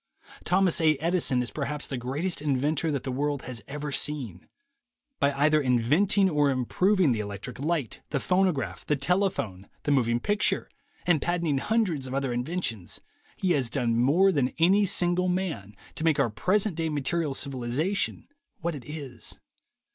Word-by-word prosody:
Thomas 185 -2 +3
A. 155 -1 +4
Edison 160 -5 +1
is 120 - -5
perhaps 150 0 -3
the 135 - -4
greatest 140 +8 -2
inventor 150 +2 0
that 140 -3 -2
the 130 - -3
world 145 +2 -1
has 120 -3 -5
ever 150 +1 -5
seen. 135 - -2 0.7
By 140 - +3
either 150 +2 +3
inventing 145 - +3
or 150 -5 +2
improving 170 - +2
the 115 - 0
electric 105 +5 -6
light, 150 -4 -2
the 140 - -1
phonograph, 180 -5 0
the 150 - +1
telephone, 140 - -1
the 145 - 0
moving 120 -4 +2
picture, 205 +10 0 0.3
and 175 -5 +3
patenting 170 -5 0
hun 225 +9 +2
dreds 155 -10 -2
of 130 - -4
other 135 -2 -1
inventions, 120 - -2 0.4
he 185 - 0
has 135 -7 +1
done 115 -1 0
more 150 +12 +4
than 135 -6 0
any 195 +5 +4
single 180 -1 +1
man 170 - -2 0.2
to - - -4
make 160 -3 +3
our 125 -5 +2
present 185 - +1
day 165 -1 0
material 150 0 -1
civilization 140 +9 -1 0.3
what 170 +1 -2
it 140 -5 -8
is. 145 -6 -6
145 Hz, 160 wpm, -27 LUFS, 130-175 Hz, 0.7 s, A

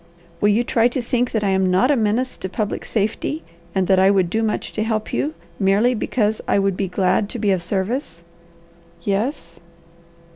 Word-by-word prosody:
"Will 205 - +4
you 215 +4 +3
try 235 -1 +3
to 245 +2 -2
think 245 0 0
that 220 -2 -1
I 200 - +2
am 190 -1 +2
not 190 +10 +3
a - - +4
menace 230 +2 0
to 190 - -5
public 210 +2 -3
safety, 225 +8 -2 0.3
and 190 -1 +2
that 190 0 +4
I 190 +1 +5
would 190 -3 +2
do 225 - +1
much 220 -1 -2
to 215 - -2
help 215 -1 -2
you, 145 +6 -1 0.2
merely 205 +6 +3
because 220 -2 0
I - - +3
would 195 -1 +1
be 195 +1 -1
glad 185 +2 +1
to 245 - -5
be 210 -3 +1
of 185 -2 +1
service?" 190 - -3 0.8
"Yes." 195 - -2
205 Hz, 195 wpm, -21 LUFS, 190-230 Hz, 0.8 s, I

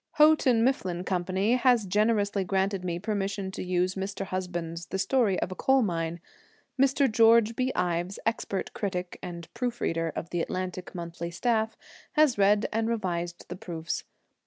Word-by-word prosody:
Houghton 300 -7 +5
Mifflin 185 -9 0
Company 190 +5 +1
has 245 -4 +3
generously 205 0 +1
granted 190 0 0
me 175 -2 -2
permission 200 -1 -2
to - - -5
use 180 0 0
Mr. 195 +1 -4
Husband's 175 -3 -4
'The - - -3
Story 210 -2 +2
of - - -2
a - - -4
Coal 265 +4 +3
Mine.' 170 -3 -2 0.6
Mr. 275 +1 +4
George 225 0 +5
B. 255 +2 0
Ives, 175 +1 -1
expert 220 -4 -2
critic 180 -3 -3
and 170 -2 -7
proof 240 0 -2
reader, 165 -1 -1
of 165 - -5
the 175 - 0
Atlantic 185 +1 -4
Monthly 170 -1 -5
staff, 220 +4 0 0.4
has 300 -9 +4
read 205 +2 +4
and 225 +1 0
revised 175 -6 -3
the 175 - -6
proofs. 170 -5 -4
195 Hz, 160 wpm, -28 LUFS, 175-225 Hz, 0.6 s, Houghton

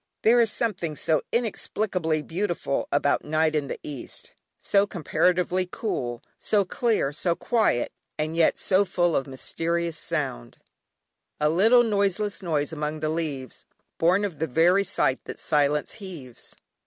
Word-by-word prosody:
There 235 +2 +6
is 225 -2 +2
something 180 -9 -1
so 155 +1 +1
inexplicably 190 -8 -1
beautiful 175 -4 -2
about 145 0 +2
night 155 +1 +1
in 150 -2 0
the - - -5
east, 145 -4 -8 0.3
so 200 0 +2
comparatively 180 +1 +1
cool, 120 - -3 0.2
so 205 -2 +2
clear, 210 - 0
so 170 +3 0
quiet, 220 - +1 0.3
and 155 +1 -2
yet 165 -1 +3
so 190 +1 +3
full 175 -4 +1
of 135 - 0
mysterious 165 +4 -2
sound, - - -4 0.8
"A 150 0 +3
little 220 +9 +5
noiseless 205 -2 0
noise 155 -4 -1
among 150 0 -3
the 155 - 0
leaves, 150 -6 -4 0.3
Born 185 +5 +3
of 175 -7 -6
the 160 - 0
very 175 +8 +4
sigh 135 -8 0
that - - -8
silence 150 0 +1
heaves." 165 - -9
170 Hz, 140 wpm, -25 LUFS, 150-200 Hz, 0.8 s, There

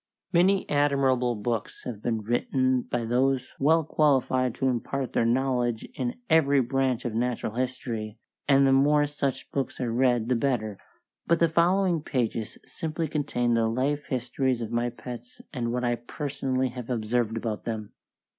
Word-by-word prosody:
Many 185 +3 +3
admirable 135 -4 +2
books 110 +1 -3
have 110 -4 -6
been 115 -2 -1
written 130 +3 +1
by 120 -1 -3
those 130 +2 +1
well 160 +4 +4
qualified 130 -5 +2
to 135 - 0
impart 130 +1 -2
their 115 - +2
knowledge 125 -2 0
in 245 0 -3
every 145 -4 +4
branch 130 -1 0
of 120 - -2
Natural 120 -1 -1
History, 120 -3 -3 0.3
and 140 -1 +5
the 135 - +4
more 145 +2 +4
such 140 -2 -3
books 135 -1 -3
are 120 -3 -1
read 120 -2 +2
the 125 - +2
better, 115 -5 -1 0.5
but 170 - +4
the 170 - +4
following 175 +1 +2
pages 115 -6 -2
simply 160 0 -3
contain 130 -5 0
the 115 -1 +2
life 140 +5 -1
histories 130 -1 -1
of 110 - -6
my 120 +1 0
pets 120 0 -9
and 120 -3 -2
what 125 +1 -1
I 120 0 +1
personally 130 0 -2
have 125 -1 -8
observed 115 -1 0
about 110 -2 -4
them. 110 -3 -4
125 Hz, 160 wpm, -27 LUFS, 120-140 Hz, 0.5 s, and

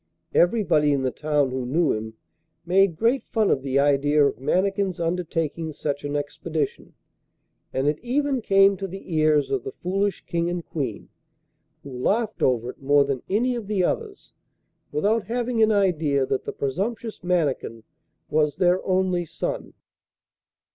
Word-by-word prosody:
Everybody 170 -7 +3
in 135 -1 0
the 130 - 0
town 150 -2 0
who 130 0 -2
knew 150 +5 +1
him 110 +1 -5 0.5
made 185 0 +3
great 235 +7 +1
fun 220 -3 +1
of 135 - +1
the 135 0 -1
idea 145 +1 +3
of 125 - -1
Mannikin's 190 +5 0
undertaking 165 -2 -2
such 145 -1 -3
an 145 0 -3
expedition, 145 +1 -3 0.8
and 135 +2 -1
it 150 0 +1
even 270 +1 0
came 195 -1 +5
to 195 - -4
the 190 -1 -8
ears 155 -1 +3
of 400 - 0
the 405 - -5
foolish 195 +2 -2
King 170 0 -1
and 175 -1 -4
Queen, 130 -9 -4 0.7
who 140 - -9
laughed 215 - -1
over 125 -1 +1
it - - -24
more 140 +1 +4
than 135 -3 -2
any 240 +6 +1
of 235 -4 -5
the 200 -3 +1
others, 420 - -3 0.6
without 205 +9 +1
having 240 0 -1
an 220 0 +5
idea 160 -9 +2
that 130 0 -2
the - - -3
presumptuous 210 - -3
Mannikin 150 -10 -1 0.4
was 150 -1 +1
their 180 0 +2
only 185 -2 +1
son! - - -5
170 Hz, 155 wpm, -24 LUFS, 145-200 Hz, 0.8 s, came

